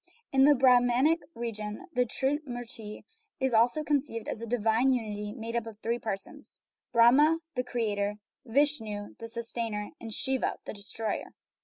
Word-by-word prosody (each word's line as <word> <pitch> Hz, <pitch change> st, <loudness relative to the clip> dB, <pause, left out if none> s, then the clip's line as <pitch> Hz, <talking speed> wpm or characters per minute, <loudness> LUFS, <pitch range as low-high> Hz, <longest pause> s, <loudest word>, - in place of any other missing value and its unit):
In 270 Hz, 0 st, +5 dB
the 295 Hz, 0 st, +7 dB
Brahmanic 255 Hz, +4 st, +4 dB, 0.2 s
religion 215 Hz, -, -5 dB
the 250 Hz, 0 st, +2 dB
Trimurti 245 Hz, -6 st, -3 dB, 0.4 s
is 265 Hz, -2 st, 0 dB
also 245 Hz, +7 st, +4 dB
conceived 275 Hz, -7 st, -1 dB
as 220 Hz, -, -4 dB
a 230 Hz, -, -5 dB
"divine 230 Hz, +2 st, +2 dB
unity" 210 Hz, -4 st, -2 dB
made 230 Hz, 0 st, -6 dB
up 235 Hz, -1 st, -1 dB
of 220 Hz, -2 st, -9 dB
three 235 Hz, +1 st, 0 dB
persons 195 Hz, -4 st, -5 dB, 0.3 s
Brahma 265 Hz, +7 st, +6 dB, 0.2 s
(the 250 Hz, -, -1 dB
creator), 210 Hz, -4 st, -1 dB, 0.3 s
Vishnu 225 Hz, -6 st, 0 dB
(the 230 Hz, -, -6 dB
sustainer), 230 Hz, -2 st, -3 dB
and 225 Hz, -, -7 dB
Shiva 265 Hz, +3 st, 0 dB
(the -, -, -5 dB
destroyer). 210 Hz, +1 st, -4 dB
235 Hz, 145 wpm, -29 LUFS, 220-265 Hz, 0.4 s, the